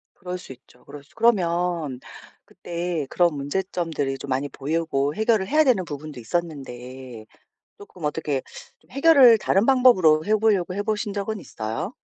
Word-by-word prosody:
그럴 180 0 -6
수 180 - -12
있죠. 125 -1 -24
그럴 140 0 -11
수 145 - -27
그러면 175 - +1 0.5
그때 170 -3 -4
그런 175 -2 +2
문제점들이 145 -2 -3
좀 140 - -9
많이 135 +2 -1
보이고 145 -1 -2
해결을 220 -3 +1
해야 310 +2 +4
되는 240 -10 +2
부분도 145 -2 -8
있었는데 130 -5 -6 0.5
쪼끔 185 -4 -14
어떻게 150 -2 -2 0.4
좀 - - -29
해결을 275 -5 +6
다른 195 +1 +2
방법으로 190 -13 +4
해 215 - +3
보려고 205 -5 +1
해 200 +2 -3
보신 210 -1 -2
적은 205 +1 -3
있어요? 115 - -5
170 Hz, 335 characters per minute, -23 LUFS, 140-205 Hz, 0.5 s, 해결을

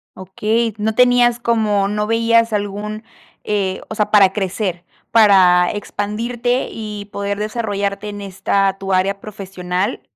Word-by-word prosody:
Okey, 215 +4 -1
no 215 +1 -1
tenías 245 -1 +4
como 215 -4 +1
no 210 +1 -2
veías 230 0 +2
algún 210 +1 -3 0.4
eh, 195 -3 -1
o 220 - -5
sea, 210 -1 -1
para 195 -3 +5
crecer, 190 -3 -3 0.3
para 190 -5 +5
expandirte 230 +5 -2
y 210 -2 -6
poder 200 0 -3
desarrollarte 210 -2 -3
en 205 0 -7
esta 195 0 0
tu 195 0 -4
área 195 +2 +1
profesional 190 0 -4
205 Hz, 130 wpm, -18 LUFS, 195-225 Hz, 0.4 s, para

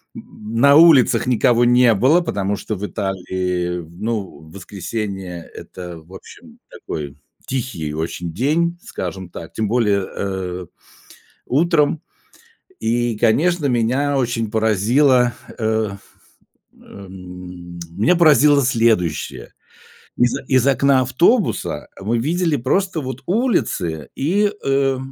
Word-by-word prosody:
м, 110 +2 -10
на 140 +4 +6
улицах 160 -7 +5
никого 120 0 +3
не 120 -1 +5
было, 140 - +4
потому 100 - -2
что 110 - -5
в 105 +2 -5
Италии, 90 -2 -3
ну, 105 +2 -4
воскресенье- 95 -1 -6
это, 90 -2 -9
в 85 +4 -18
общем, - - -14
такой 75 -2 -7 0.3
тихий 115 - -4
очень 80 +2 -4
день, 165 - 0
скажем 95 0 -6
так, 85 - -9
тем 110 -1 -2
более, 105 -4 +1
э, 90 -2 -4 0.8
утром. 155 +1 +2 0.8
И, 115 0 0
конечно, 150 +8 +2
меня 130 +4 +1
очень 120 -4 -1
поразило, 120 +4 +3 0.2
э, 110 -2 0 0.8
эм. 90 -2 -11 0.2
Меня 115 - +3
поразило 150 -3 +5
следующее. 90 - 0 0.6
Из 120 0 +2
о - - -8
из 130 -1 +3
окна 135 0 +3
автобуса 170 - +1
мы 115 +4 -1
видели 165 +3 0
просто 165 +7 0
вот 130 0 -6
улицы 175 - -1
и, 200 +8 +1
э, 135 -1 +1
115 Hz, 110 wpm, -19 LUFS, 95-140 Hz, 0.8 s, на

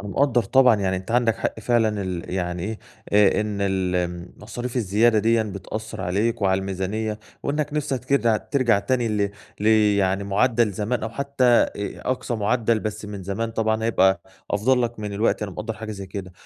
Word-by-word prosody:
أنا 100 - -7
مقدّر 125 0 +2
طبعًا 125 +1 +5
يعني 95 -1 0
أنت 95 +4 -7
عندك 120 -2 +2
حق 110 - -3
فعلًا، 110 -4 +1
ال 90 -2 -4
يعني 90 -1 -2
إيه، 110 +1 -4 0.3
آآ، 105 0 +5
إن 105 -1 -3
ال 95 -2 0
امم، 90 0 -3
المصاريف 120 +4 -6
الزيادة 110 +1 +3
ديًّا 115 +1 +3
بتأثر 110 +1 -6
عليك 105 +4 0
وعلى 95 0 +2
الميزانية، 100 +3 -3 0.2
وإنك 150 +1 -1
نِفسك 140 -4 -2
كده 120 -5 +2
ترجع 120 -4 +1
تاني 120 +1 0
ل 100 -2 0 0.3
ل 105 - -1 0.3
يعني 95 +1 +1
معدل 115 +2 +2
زمان 110 +5 -2
أو 110 - -2
حتى 140 +2 -2
أ 120 -1 +5 0.4
أقصى 125 -1 -2
معدل 110 +1 +1
بس 105 +1 -4
من 100 -2 -7
زمان 100 +5 -3
طبعًا 110 0 0
هيبقى 95 -5 +3 0.3
أفضل 125 +5 +2
لك 120 -2 -3
من 105 -1 -4
دلوقتي، 105 +1 0
أنا 100 - -7
مقدر 115 +4 -4
حاجة 110 0 -6
زي 100 -1 -7
كده، 95 -1 -7
110 Hz, 185 wpm, -23 LUFS, 100-120 Hz, 0.4 s, طبعًا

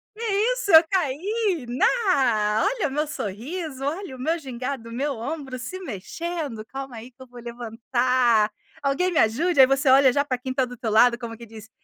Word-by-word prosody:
"Que 460 - -8 0.3
isso, - - -2
eu 320 0 +9
caí! 370 - -1
Ná, 250 - +2
olha 420 - 0
meu 295 +3 -1
sorriso, 270 - -5
olha 315 -2 -4
o - - -13
meu 320 +6 0
gingado, 255 -3 -6
meu 275 +4 -2
ombro 265 +1 -5
se 365 +10 -6
mexendo, 295 - -5
calma 270 0 -7
aí 240 +3 -10
que 260 +2 -14
vou 245 0 -13
levantar, 235 -1 +1 0.3
alguém 285 +7 0
me 325 - +1
ajude?" 275 +9 +2
Aí 260 - +9
você 270 +1 +2
olha 265 0 +6
já 285 +3 +1
para 255 -3 -2
quem 260 +1 -5
está 260 0 +1
do 245 0 -9
teu 230 -1 -3
lado 235 +2 +5
como 230 -2 -7
que 235 - -11
diz: 220 0 -13
260 Hz, 190 wpm, -24 LUFS, 235-320 Hz, 0.3 s, eu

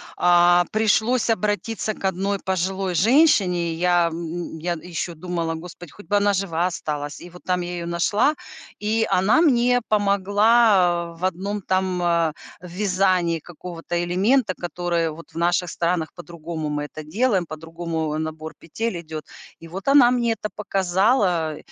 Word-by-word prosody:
а, 175 0 +5
пришлось 220 +3 +2
обратиться 215 +1 -1
к 200 - -8
одной 195 +2 -1
пожилой 190 0 -2
женщине. 190 - +3
Я, 175 0 +2
м, 170 +1 -5
м, - - -7
я 175 +2 -1
ещё 170 +1 -5
думала: 165 0 -3
"Господь, 175 0 -10
хоть 205 - -15
бы 205 - +1
она 205 0 +3
жива 180 -3 0
осталась". 145 -4 -4
И 175 - -11
вот 180 +1 -15
там 180 -1 0
я 175 0 -5
её 170 -1 -5
нашла, 205 - +1 0.5
и 220 +2 +1
она 200 - +3
мне 245 -5 +3
помогла, 200 -3 +3
э, - - -18
в 185 - -1
1 195 +3 -2
там, 185 -1 -1
а, 170 -2 +1 0.3
вязании 180 -2 0
какого-то 175 +1 -6
элемента, 195 +6 +2
который 175 -1 -2
вот 165 +2 -12
в - - -24
наших 175 +1 +1
странах 170 -2 -1
по-другому 170 -2 -6
мы 150 0 -2
это 155 +1 -9
делаем, 195 +3 0
по-другому, 160 0 -4
э, - - -2
набор 160 0 -5
петель 180 +2 -4
идёт. 155 -2 -8 0.3
И 165 - -11
вот 190 +9 -4
она 275 -4 +6
мне 240 -2 +1
это 215 -1 -3
показала, 190 - +1
180 Hz, 160 wpm, -22 LUFS, 170-205 Hz, 0.5 s, она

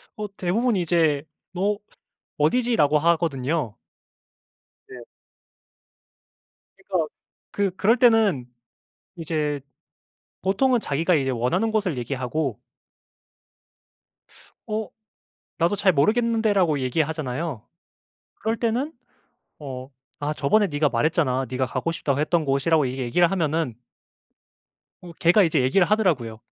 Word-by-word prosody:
어 210 0 -4
대부분 220 +7 0
이제 165 -5 +2 0.3
"너 200 +3 0 0.6
어디지."라고 155 - +2
하거든요. 155 -6 0 1.1
네. 125 -2 -10 1.7
그니까 185 -4 -2 0.4
그 200 -2 0
그럴 225 +6 +3
때는 220 - +4 0.7
이제 155 -3 -2 0.8
보통은 235 +6 +2
자기가 165 +2 0
이제 135 -4 +1
원하는 130 - 0
곳을 195 - -1
얘기하고 130 0 -3 2.1
어 215 0 -3 0.7
"나도 170 +4 +2
잘 195 -1 +3
모르겠는데."라고 210 -1 +2
얘기하잖아요. 145 -1 -2 0.8
그럴 225 +1 -2
때는 240 +7 -1 0.7
어 130 -2 -7 0.3
"아 150 +1 -2
저번에 200 +10 +2
네가 145 -2 +1
말했잖아 135 0 +1
네가 130 0 -1
가고 165 +6 -2
싶다고 140 -4 -1
했던 155 +1 +1
곳."이라고 140 +2 +2
이렇게 130 +1 -3
얘기를 170 +8 +3
하면은 160 - -1 1.3
어 175 -1 -11
걔가 175 +5 +4
이제 160 -6 +2
얘기를 175 +9 +3
하더라고요. 155 - +1
165 Hz, 250 characters per minute, -24 LUFS, 140-200 Hz, 2.1 s, 때는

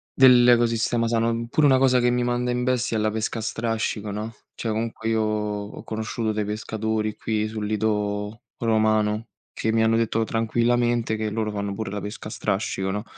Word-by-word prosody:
dell'ecosistema 120 -2 +5
sano. 115 0 +1
Mh, 115 0 -3
pure 145 +5 +3
una 135 -2 +5
cosa 130 -1 +4
che 120 0 +3
mi 125 0 +1
manda 120 0 0
in 125 0 -1
bestia 125 -2 0
è - - 0
la 105 0 +1
pesca 110 +2 -2
a - - -4
strascico, 110 -1 -2
no. 105 +3 -5 0.2
Cioè, 115 - -3
comunque 110 0 -3
io 110 -1 +2
ho 105 -1 -3
conosciuto 110 0 -3
dei 105 0 -1
pescatori 110 0 -2
qui 110 -1 -1
sul 110 -1 -4
lido 105 0 -1 0.2
romano 110 -1 +1 0.3
che 110 - -1
mi 110 0 +3
hanno 110 0 +3
detto 115 0 +1
tranquillamente 120 +1 +1
che 110 0 -2
loro 110 0 -2
fanno 100 -1 -3
pure 110 -2 -4
la 105 0 -4
pesca 105 +1 -7
a - - -10
strascico, 100 -2 -2
no. 105 +2 -2
110 Hz, 190 wpm, -24 LUFS, 105-115 Hz, 0.3 s, dell'ecosistema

